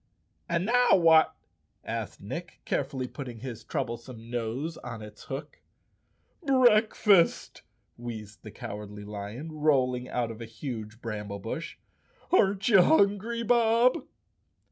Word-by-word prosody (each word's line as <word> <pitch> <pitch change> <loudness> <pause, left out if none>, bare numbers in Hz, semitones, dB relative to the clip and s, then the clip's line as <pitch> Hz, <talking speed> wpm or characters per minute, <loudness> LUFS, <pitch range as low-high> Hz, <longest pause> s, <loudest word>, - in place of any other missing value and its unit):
"And 170 +1 +1
now 245 +2 +5
what?" 165 -3 +5 0.5
asked - - -5
Nick, - - -7
carefully 130 -1 -2
putting 125 -5 -8
his 120 -3 -7
troublesome 115 0 -5
nose 120 +7 -3
on 115 -3 -7
its 105 0 -12
hook. 135 +1 -7 0.4
" - - -37
Breakfast 220 - +4 0.4
1" 120 - -11
wheezed 105 -3 -7
the 110 - -9
Cowardly 105 0 -8
Lion, 105 +9 -6
rolling 130 -5 +1
out 120 -2 -1
of 115 +1 -10
a - - -5
huge 110 -1 -7
bramble 105 -3 -4
bush. 115 +11 -6 0.5
"Aren't 200 - +3
you 200 -6 +7
hungry, 200 +7 +3
Bob?" 235 +1 +3
130 Hz, 125 wpm, -28 LUFS, -, 0.5 s, you